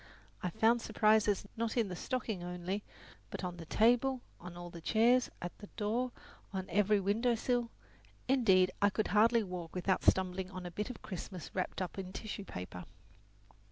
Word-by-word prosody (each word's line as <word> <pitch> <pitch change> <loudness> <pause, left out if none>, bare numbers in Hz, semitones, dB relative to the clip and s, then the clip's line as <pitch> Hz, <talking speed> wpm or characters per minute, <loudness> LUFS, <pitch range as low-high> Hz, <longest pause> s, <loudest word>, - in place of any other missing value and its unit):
I 180 - -1
found 230 +6 +3
surprises, 215 -2 +3
not 230 +1 -2
in 230 -3 +3
the 180 - -5
stocking 225 -3 -2
only, 180 +3 -3 0.5
but - - -6
on 180 -1 -3
the 165 -2 -9
table, 245 +5 +3 0.2
on 175 0 -9
all 175 0 -7
the 170 - -9
chairs, 240 +7 +4
at 175 - -5
the 205 - -9
door, 235 +4 0 0.4
on 190 -1 -3
the 200 +4 +3
very 210 +1 +3
window 225 +5 +2
sill; 240 +1 0 0.6
indeed, 195 -9 +5
I 205 - +6
could 215 +2 -1
hardly 225 +2 +5
walk 180 -3 -6
without 185 +1 +1
stumbling 185 0 +2
on 185 -1 -7
a 175 - -5
bit 210 +7 -3
of 250 - -8
Christmas 185 -2 -7
wrapped 185 0 -2
up 185 - -6
in 185 -1 -6
tissue 205 -1 -5
paper. 90 - -7
200 Hz, 180 wpm, -34 LUFS, 180-230 Hz, 0.6 s, I